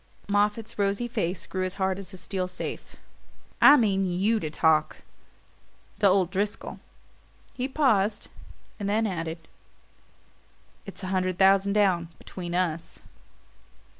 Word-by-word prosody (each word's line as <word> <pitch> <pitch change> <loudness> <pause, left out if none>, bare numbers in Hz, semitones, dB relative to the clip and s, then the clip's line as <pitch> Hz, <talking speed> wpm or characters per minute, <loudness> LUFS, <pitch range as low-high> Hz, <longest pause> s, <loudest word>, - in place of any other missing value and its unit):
Moffatt's 210 +2 0
rosy 200 +4 0
face 195 -6 -3
grew 185 -1 -3
as 185 0 -3
hard 190 -1 -1
as 190 -1 -8
a 190 - -9
steel 185 0 -3
safe. 180 - -7 0.7
"I 290 - +9
mean 200 -6 +2
YOU 190 +5 +1
to 155 - -4
talk 155 0 +1 1.0
to 205 - +5
old 185 -2 +3
Driscoll." 205 +3 -3 0.7
He 255 +1 -2
paused, 225 -8 +1 0.5
and 200 -1 -2
then 220 +2 +1
added: 165 -4 -4 1.4
"It's 195 - -9
a - - -3
hundred 185 -1 0
thousand 195 +1 +4
down, 190 -5 +2
between 175 -2 -7
us." 170 -2 -2
195 Hz, 130 wpm, -26 LUFS, 180-205 Hz, 1.4 s, I